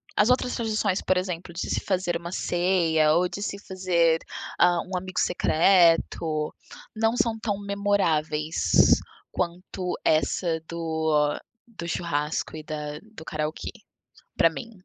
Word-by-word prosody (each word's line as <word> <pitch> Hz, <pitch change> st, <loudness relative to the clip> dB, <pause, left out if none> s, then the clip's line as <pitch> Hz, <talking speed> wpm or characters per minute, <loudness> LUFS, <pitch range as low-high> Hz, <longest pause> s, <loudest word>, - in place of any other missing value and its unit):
as 210 Hz, +4 st, +4 dB
outras 250 Hz, 0 st, +1 dB
tradições, 215 Hz, -5 st, 0 dB
por 185 Hz, -, +1 dB
exemplo, 180 Hz, -1 st, -3 dB
de 175 Hz, -, -4 dB
se -, -, 0 dB
fazer 180 Hz, -3 st, 0 dB
uma 170 Hz, +1 st, -8 dB
ceia 170 Hz, -4 st, +2 dB
ou 180 Hz, +2 st, +2 dB
de 200 Hz, -, -6 dB
se 200 Hz, -, -4 dB
fazer, 180 Hz, -4 st, +1 dB, 0.4 s
ah, 175 Hz, 0 st, +5 dB
um 185 Hz, 0 st, -4 dB
amigo 185 Hz, 0 st, -4 dB
secreto, 165 Hz, -3 st, +3 dB, 0.4 s
não 225 Hz, +1 st, +1 dB
são 230 Hz, -2 st, +1 dB
tão 205 Hz, -3 st, -2 dB
memoráveis 160 Hz, -, +2 dB, 0.4 s
quanto 180 Hz, +1 st, -3 dB
essa 160 Hz, +1 st, +1 dB
do 160 Hz, -3 st, 0 dB, 0.3 s
do 205 Hz, -8 st, -8 dB
churrasco 155 Hz, -2 st, -2 dB
e 155 Hz, -, -8 dB
da 150 Hz, -1 st, -5 dB
do 160 Hz, -, -10 dB
karaokê 155 Hz, 0 st, -3 dB, 0.7 s
pra 165 Hz, -, +5 dB
mim. 230 Hz, +8 st, -8 dB
175 Hz, 135 wpm, -26 LUFS, 160-190 Hz, 0.7 s, ah